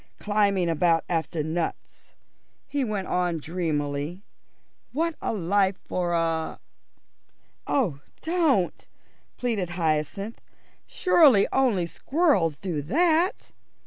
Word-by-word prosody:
Climbing 200 Hz, -3 st, +1 dB
about 165 Hz, 0 st, +2 dB
after 165 Hz, -2 st, -1 dB
nuts," 160 Hz, +2 st, -5 dB, 0.5 s
he 280 Hz, 0 st, -2 dB
went 210 Hz, -5 st, -2 dB
on 180 Hz, -2 st, 0 dB
dreamily, 155 Hz, 0 st, -3 dB, 0.7 s
"what 330 Hz, +4 st, 0 dB
a -, -, -1 dB
life 195 Hz, -1 st, +1 dB
for 175 Hz, -1 st, -1 dB
a 165 Hz, -1 st, -1 dB, 0.5 s
" -, -, -44 dB, 0.3 s
"Oh, 195 Hz, -, 0 dB, 0.2 s
don't!" 320 Hz, -, +1 dB, 0.5 s
pleaded 220 Hz, -8 st, -1 dB
Hyacinth. 165 Hz, +6 st, -1 dB, 0.5 s
"Surely 295 Hz, -, +5 dB
only 240 Hz, -10 st, +2 dB
squirrels 225 Hz, -, +1 dB
do 175 Hz, -6 st, -3 dB
that?" 330 Hz, -, +1 dB
185 Hz, 100 wpm, -26 LUFS, 165-250 Hz, 0.7 s, Surely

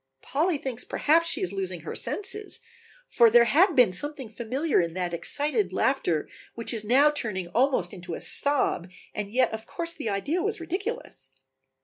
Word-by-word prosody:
Polly 320 Hz, +3 st, 0 dB
thinks 255 Hz, -3 st, -4 dB
perhaps 330 Hz, +3 st, +2 dB
she -, -, -1 dB
is 185 Hz, +1 st, -2 dB
losing 185 Hz, -3 st, -4 dB
her -, -, -6 dB
senses, 415 Hz, +1 st, -3 dB, 0.5 s
for 235 Hz, -2 st, +5 dB
there 235 Hz, +1 st, +6 dB
had 335 Hz, -, +4 dB
been 245 Hz, -8 st, +5 dB
something 285 Hz, -, 0 dB
familiar 250 Hz, -, 0 dB
in 170 Hz, 0 st, -4 dB
that 180 Hz, -2 st, -2 dB
excited 225 Hz, -, +1 dB
laughter 180 Hz, -, 0 dB, 0.3 s
which 230 Hz, +1 st, -3 dB
is 220 Hz, -2 st, -1 dB
now 270 Hz, +7 st, +4 dB
turning 190 Hz, -11 st, -3 dB
almost 255 Hz, +8 st, +1 dB
into 175 Hz, -2 st, -6 dB
a -, -, -7 dB
sob, 280 Hz, -10 st, +1 dB, 0.2 s
and 205 Hz, -1 st, -4 dB
yet 250 Hz, -1 st, +2 dB
of 220 Hz, 0 st, -6 dB
course 335 Hz, -1 st, -4 dB
the 285 Hz, -9 st, -4 dB
idea 285 Hz, -, -1 dB
was 420 Hz, +1 st, -1 dB
ridiculous. 395 Hz, +9 st, -5 dB
250 Hz, 170 wpm, -26 LUFS, 200-305 Hz, 0.5 s, there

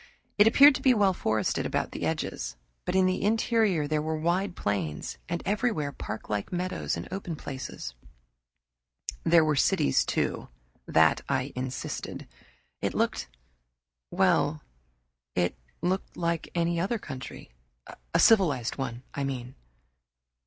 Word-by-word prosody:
It 205 Hz, -, +8 dB
appeared 280 Hz, +5 st, +8 dB
to -, -, -4 dB
be 255 Hz, -2 st, +5 dB
well 200 Hz, -3 st, +4 dB
forested 110 Hz, -, 0 dB
about -, -, -1 dB
the -, -, -2 dB
edges, -, -, -3 dB, 0.3 s
but -, -, -1 dB
in 190 Hz, 0 st, +5 dB
the 185 Hz, 0 st, +1 dB
interior 215 Hz, -6 st, +2 dB
there 155 Hz, 0 st, 0 dB
were 155 Hz, +1 st, -2 dB
wide 175 Hz, +4 st, 0 dB
plains, 90 Hz, -8 st, -3 dB
and 170 Hz, 0 st, -2 dB
everywhere 205 Hz, -8 st, 0 dB
parklike 105 Hz, -5 st, -4 dB
meadows 180 Hz, +1 st, -2 dB
and -, -, -6 dB
open 185 Hz, -3 st, -4 dB
places. 130 Hz, -, -6 dB, 1.3 s
There 165 Hz, -1 st, +5 dB
were 155 Hz, -1 st, +2 dB
cities, 70 Hz, -, +3 dB
too; -, -, -1 dB, 0.4 s
that 80 Hz, 0 st, +4 dB
I 135 Hz, 0 st, -1 dB
insisted. 130 Hz, +1 st, -5 dB, 0.5 s
It -, -, -1 dB
looked -, -, 0 dB, 0.8 s
well, -, -, +2 dB, 0.7 s
it 90 Hz, -1 st, +1 dB, 0.3 s
looked 185 Hz, +2 st, -1 dB
like 170 Hz, -1 st, -1 dB
any 170 Hz, 0 st, +1 dB
other 200 Hz, +7 st, 0 dB
country 130 Hz, -, -8 dB, 0.6 s
a -, -, +2 dB
civilized 160 Hz, -, +4 dB
one, 120 Hz, -2 st, -4 dB
I 140 Hz, -, -2 dB
mean. 130 Hz, -2 st, -4 dB
160 Hz, 130 wpm, -28 LUFS, 130-190 Hz, 1.3 s, It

